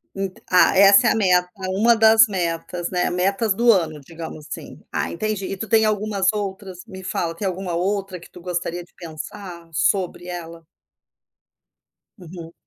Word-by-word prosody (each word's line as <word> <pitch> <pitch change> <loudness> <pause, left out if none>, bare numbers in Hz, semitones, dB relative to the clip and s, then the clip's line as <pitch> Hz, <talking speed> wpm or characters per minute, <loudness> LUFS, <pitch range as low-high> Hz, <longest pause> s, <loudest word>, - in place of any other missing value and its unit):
Ent 195 -1 -3 0.2
ah, 180 +1 +5
essa 200 0 +7
é - - +4
a - - +1
meta, 180 -4 +3 0.2
uma 220 +5 +3
das 220 +2 +6
metas, 175 -2 -3
né, 180 -1 0
metas 195 +3 0
do 235 +1 +5
ano, 160 -6 0
digamos 160 0 -9
assim. - - -8
Ah, - - -2
entendi. 210 +1 -3
E 195 - -5
tu 220 +3 -5
tem 220 -1 +4
algumas 210 -2 0
outras? 195 -3 -5
Me 190 -4 -10
fala 170 -2 -2
tem 195 +3 -3
alguma 185 -1 -4
outra 195 +1 -2
que 170 - -15
tu 180 - -13
gostaria 175 0 -3
de - - -25
pensar 170 +1 -9
sobre 180 +1 0
ela? 170 -2 -8 1.6
Uhum. 170 -1 -10
185 Hz, 165 wpm, -22 LUFS, 175-200 Hz, 1.6 s, essa